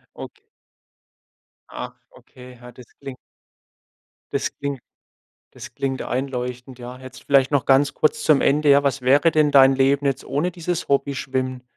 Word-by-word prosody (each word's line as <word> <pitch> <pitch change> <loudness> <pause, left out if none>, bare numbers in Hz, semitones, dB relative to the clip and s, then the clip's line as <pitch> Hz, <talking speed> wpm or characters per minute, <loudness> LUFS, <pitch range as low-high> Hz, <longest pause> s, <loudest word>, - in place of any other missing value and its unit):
Okay. 420 +2 -12 1.2
Ah, - - -7 0.2
okay. 125 - -16
Ja, 120 0 -12
das 125 0 -15
kling 135 -2 -9 1.2
das - - -3
klingt 140 -2 -4 0.7
das - - -12
klingt 135 -1 -3
einleuchtend, 125 -1 -5
ja. 125 +1 -9
Jetzt 130 0 -13
vielleicht 140 -1 +3
noch 145 -3 +1
ganz 135 +1 +3
kurz 155 0 0
zum 150 -3 +3
Ende: 150 +1 +2
Ja, 140 0 +5
was 140 0 0
wäre 140 +6 +4
denn 155 -1 +3
dein 135 -1 +6
Leben 135 +1 +1
jetzt 135 - -2
ohne 150 +6 -2
dieses 175 0 -4
Hobby 140 0 0
Schwimmen? 130 -1 -3
135 Hz, 155 wpm, -21 LUFS, 130-145 Hz, 1.2 s, dein